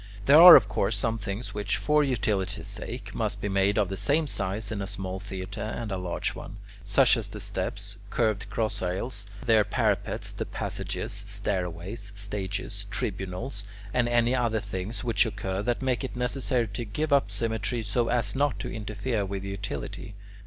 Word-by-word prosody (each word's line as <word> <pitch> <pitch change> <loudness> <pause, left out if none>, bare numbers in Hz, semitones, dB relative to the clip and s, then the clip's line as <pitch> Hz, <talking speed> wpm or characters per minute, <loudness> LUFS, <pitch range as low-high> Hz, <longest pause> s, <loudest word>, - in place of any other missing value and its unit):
There 150 +4 +8
are, 175 -1 +13
of 110 -7 +7
course, 105 0 0
some 115 +3 0
things 100 +3 -4
which, 105 0 0
for 150 0 +3
utility's 110 -8 -1
sake, - - -6
must - - -1
be - - -2
made 100 +1 +2
of 105 -3 +3
the 95 +1 -4
same 150 +8 +2
size 105 -5 -2
in 105 -3 -2
a 95 - -3
small 95 -2 -4
theatre, 95 +1 -6
and 110 0 -4
a 95 - -1
large 90 -1 -2
one: - - -9 0.3
such - - +4
as - - -3
the - - -8
steps, 100 0 -4
curved 110 -3 0
cross 110 -1 -1
aisles, 100 +4 -3 0.2
their 110 -2 +5
parapets, 100 - 0
the - - -4
passages, - - -3
stairways, 95 +4 -2
stages, 100 0 -3
tribunals, 100 +3 -3 0.3
and 120 -1 +2
any 120 +1 +3
other 120 -3 +1
things 100 +2 -4
which 115 -2 +3
occur 100 -3 -3
that 120 +4 -1
make 130 0 0
it 130 - -5
necessary 125 -1 0
to 105 +4 -4
give 145 +8 -1
up 140 -7 +4
symmetry 110 +3 -2
so 115 +3 +1
as 120 +2 0
not 145 0 +1
to - - -5
interfere 110 +1 -2
with 95 0 -4
utility. 100 -3 -5
105 Hz, 175 wpm, -27 LUFS, 100-120 Hz, 0.3 s, are